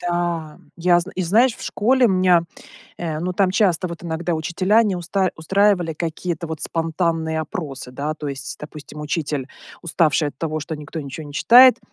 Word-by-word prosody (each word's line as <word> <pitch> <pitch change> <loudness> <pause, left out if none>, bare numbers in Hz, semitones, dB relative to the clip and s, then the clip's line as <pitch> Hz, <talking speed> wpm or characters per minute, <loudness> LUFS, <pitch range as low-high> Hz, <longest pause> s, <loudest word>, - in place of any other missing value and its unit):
Да, 175 -3 -2 0.2
я 175 0 +3
зн 180 +3 -6
и 185 - -1
знаешь, 220 +8 +3
в - - -11
школе 250 +4 +2
меня, 185 -4 +4 0.6
э, 160 -3 -3
ну 180 +2 -2
там 185 0 +2
часто, 185 -3 +2
вот, 170 0 -8
иногда 170 +1 -2
учителя 185 +7 +2
не 205 -4 0
уста 185 +2 0
устраивали 190 0 +2
какие-то, 170 +1 -4
вот, 160 -1 -6
спонтанные 165 -1 -1
опросы, 145 -5 -6
да, 145 +4 -3
то 150 -1 -6
есть, 135 -1 -6
допустим, 150 0 -10
учитель, 150 -3 -2 0.3
уставший 160 -2 +1
от 140 - -13
того, 155 -1 -2
что 155 +2 -5
никто 150 +2 -7
ничего 145 +2 -7
не 145 - -10
читает 245 - +7
170 Hz, 175 wpm, -21 LUFS, 155-185 Hz, 0.6 s, читает